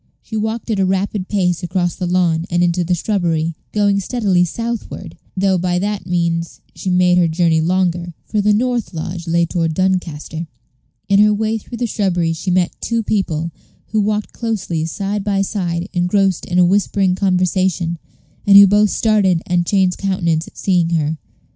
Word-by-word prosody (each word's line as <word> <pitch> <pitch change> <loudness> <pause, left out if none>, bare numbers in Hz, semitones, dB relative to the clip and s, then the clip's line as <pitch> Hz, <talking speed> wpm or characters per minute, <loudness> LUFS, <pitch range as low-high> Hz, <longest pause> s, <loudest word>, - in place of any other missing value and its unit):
She 220 - -8
walked 220 +2 -2
at 210 - 0
a - - +3
rapid 190 0 -1
pace 180 -4 0
across 175 0 -1
the 180 - -4
lawn, 175 -2 +1
and 175 0 +1
into 175 0 +1
the 175 +1 0
shrubbery, 170 -4 -1 0.2
going 205 -1 +2
steadily 195 -4 +1
southward, 230 +6 -5 0.2
though 190 -1 +2
by 180 0 0
that 200 -1 -3
means 170 -1 -1
she 190 - -5
made 180 0 +4
her 175 - +4
journey 165 -1 +2
longer; 175 0 0
for 210 - -1
the 210 +1 +3
north 235 -2 0
lodge 170 +2 -5
lay 170 +1 +2
toward 165 -2 -1
Doncaster. 170 -3 -2 0.6
In 200 0 +3
her 210 0 +6
way 220 +1 0
through 235 +3 -9
the 245 - -1
shrubbery 180 -7 0
she 170 +4 -4
met 180 -1 +1
two 230 -1 -1
people, 170 -6 -1 0.4
who 215 0 +1
walked 210 0 -1
closely 190 -9 -2
side 200 +4 -3
by 195 -1 +1
side, 180 -4 -2
engrossed 185 +1 +1
in 175 - -1
a 180 - +6
whispering 195 0 +2
conversation, 185 -2 0 0.5
and 200 0 +8
who 200 - +10
both 205 +2 +4
started 195 -7 +2
and 175 -1 0
changed 190 -3 +1
countenance 170 -5 0
at - - -16
seeing 175 -4 +1
her. 155 0 -1
185 Hz, 175 wpm, -18 LUFS, 170-205 Hz, 0.6 s, who